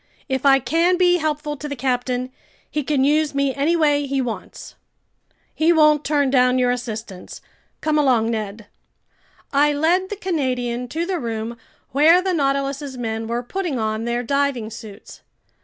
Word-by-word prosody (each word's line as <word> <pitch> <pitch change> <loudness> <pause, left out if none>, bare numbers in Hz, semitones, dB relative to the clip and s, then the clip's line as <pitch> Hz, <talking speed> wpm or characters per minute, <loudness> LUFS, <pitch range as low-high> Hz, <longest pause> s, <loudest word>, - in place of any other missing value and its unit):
If 265 0 0
I 270 0 +7
can 335 +7 +1
be 355 -1 +4
helpful 300 -1 -2
to 295 - -6
the 285 - -4
captain, 250 0 -2 0.4
he 300 - -2
can 280 -1 0
use 295 +1 +2
me 280 -1 +1
any 290 +5 +1
way 290 -3 +2
he 275 0 -1
wants." 240 -4 -6 0.8
"He 320 +2 +3
won't 305 -2 +4
turn 285 -2 +1
down 250 -1 +4
your 250 -1 +2
assistance. 220 -6 -6 0.4
Come 305 -1 +1
along, 240 -5 +2
Ned." 215 -1 -4 0.9
I 290 +1 +4
led 345 +6 +1
the 415 - -4
Canadian 255 -10 -2
to 325 +7 -3
the 365 -1 -2
room 230 -2 -4 0.4
where 315 +6 +5
the 370 0 -1
Nautilus's 275 -2 -1
men 225 -2 -3
were 235 +1 -2
putting 345 +1 -3
on 220 0 -2
their 240 +1 -1
diving 275 -4 -1
suits. 220 -2 -11
275 Hz, 160 wpm, -21 LUFS, 245-305 Hz, 0.9 s, I